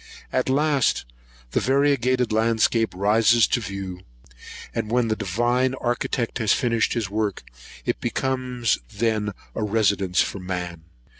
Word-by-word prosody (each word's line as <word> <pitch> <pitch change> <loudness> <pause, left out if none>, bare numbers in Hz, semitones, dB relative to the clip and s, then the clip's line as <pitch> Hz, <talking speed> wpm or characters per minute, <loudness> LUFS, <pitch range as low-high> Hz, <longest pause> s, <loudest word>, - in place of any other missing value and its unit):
At 130 0 +1
last 140 - +2 0.5
the - - +2
variegated 130 -3 +2
landscape 115 +1 +2
rises 110 +4 +4
to - - +2
the 110 - -6
view; 95 -2 -6 0.7
and 115 -2 -2
when 120 0 +1
the 110 - +1
divine 120 +6 0
Architect 120 -1 -2
has 110 -2 +3
finished 115 -4 +1
his 110 -5 -2
work, 105 -2 -1 0.4
it - - -1
becomes 125 -3 -1
then 105 -1 0 0.2
a - - -4
residence 100 -3 +1
for 100 - +1
man. 90 -3 -5
115 Hz, 135 wpm, -24 LUFS, 100-125 Hz, 0.7 s, rises